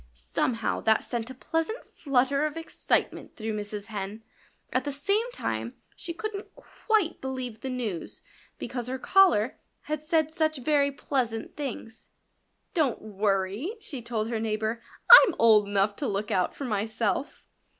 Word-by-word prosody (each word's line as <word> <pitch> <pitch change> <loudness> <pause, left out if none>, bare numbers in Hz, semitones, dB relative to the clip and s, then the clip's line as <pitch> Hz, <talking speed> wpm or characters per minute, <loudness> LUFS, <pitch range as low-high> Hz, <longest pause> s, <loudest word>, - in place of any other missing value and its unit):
Somehow 135 - -1
that 220 -1 +3
sent 235 -1 -4
a 260 - -8
pleasant 325 - -2
flutter 275 +1 +1
of 305 +1 -7
excitement 325 - -1
through 220 0 -4
Mrs. 210 -1 -5
Hen. 210 0 -6 0.5
At - - +2
the 290 - -3
same 405 - 0
time 115 - -3 0.2
she 340 - -7
couldn't 420 +2 -5
quite 435 -7 -1
believe 255 -4 -5
the 265 - -4
news, 230 -9 -4 0.3
because 245 -2 -5
her 260 +1 -3
caller 260 - +4 0.2
had 305 -1 -3
said 315 -1 +1
such 315 -2 0
very 280 +1 +2
pleasant 250 -5 -2
things. 250 -5 -6 0.6
"Don't 300 -8 +1
worry!" 205 - -1
she 290 - -4
told 225 -1 -2
her 230 -2 -1
neighbor. 220 +1 -2 0.4
"I'm 360 - +1
old 215 -3 +6
enough 200 0 +1
to 280 - -2
look 200 0 -2
out 180 -1 +1
for 280 - -5
myself." 220 +3 -2
245 Hz, 150 wpm, -27 LUFS, 215-305 Hz, 0.6 s, old